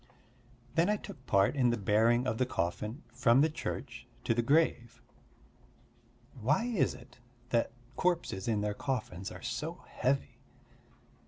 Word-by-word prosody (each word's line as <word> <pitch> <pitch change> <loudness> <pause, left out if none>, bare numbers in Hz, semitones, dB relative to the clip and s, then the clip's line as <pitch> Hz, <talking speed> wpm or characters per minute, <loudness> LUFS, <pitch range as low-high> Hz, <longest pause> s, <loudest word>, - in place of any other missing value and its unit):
Then 170 +4 +3
I 210 - +2
took 140 -8 -11
part 100 +6 +3
in 125 -3 +3
the 120 - +1
bearing 110 +5 +3
of 110 -3 -1
the 130 - +3
coffin 105 - -2
from 125 0 +4
the 155 +1 +3
church 120 -6 -5 0.2
to 115 - +2
the 120 - +2
grave. 140 -3 +2 1.4
Why 145 - +2
is 235 -7 +1
it 120 0 -15 0.3
that 115 -2 +1 0.3
corpses 170 - 0
in 110 -3 +1
their 105 0 -1
coffins 115 -6 -3
are - - -10
so - - -4
heavy? 135 +2 -1
120 Hz, 145 wpm, -32 LUFS, 110-140 Hz, 1.4 s, from